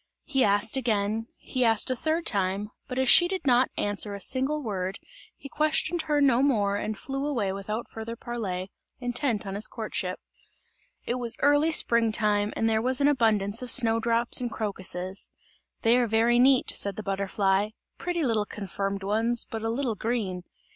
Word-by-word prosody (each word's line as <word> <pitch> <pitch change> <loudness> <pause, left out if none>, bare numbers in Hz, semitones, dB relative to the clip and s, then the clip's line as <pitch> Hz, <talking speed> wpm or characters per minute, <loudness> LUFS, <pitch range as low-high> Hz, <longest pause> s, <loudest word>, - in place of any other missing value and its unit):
He 270 -4 +1
asked 205 +4 +3
again, 220 -2 -1
he 255 - -2
asked 225 +1 +3
a - - 0
third 320 +5 -1
time, 200 0 0 0.2
but 250 - -6
as 260 0 +1
she 350 +7 +7
did 375 -3 -4
not 255 -1 +4
answer 205 0 -1
a - - -7
single 270 +7 0
word, 195 -3 -3 0.4
he - - -10
questioned 310 +3 0
her 295 -1 +3
no 265 -3 +4
more 210 -8 +2
and 215 +1 -3
flew 270 +4 -4
away 235 -10 -1
without 210 +4 -5
further 225 +1 -7
parley, 200 -6 -5 0.3
intent 245 -3 -1
on 195 - -5
his 210 +2 -1
courtship. 210 -5 -4 0.9
It 245 +1 -2
was 235 -1 +3
early 290 +3 +4
spring 235 -7 +3
time, 210 -1 +1
and 225 - 0
there 220 -1 +1
was 255 +3 +2
an 285 - +4
abundance 220 -6 +2
of 250 - -4
snow 230 -3 +5
drops 235 +2 +2
and 245 - -2
crocuses. 190 -3 -5 0.5
"They 230 +2 +4
are 245 -1 +2
very 230 +2 +3
neat," 260 0 +4
said 200 -1 -1
the 215 - -6
butterfly, 195 +1 0 0.3
"pretty 345 -2 -2
little 220 -5 0
confirmed 195 0 -4
ones, 225 +4 0
but 225 - -4
a 225 - -2
little 240 0 -1
green!" 210 -5 -3
225 Hz, 180 wpm, -26 LUFS, 205-255 Hz, 0.9 s, she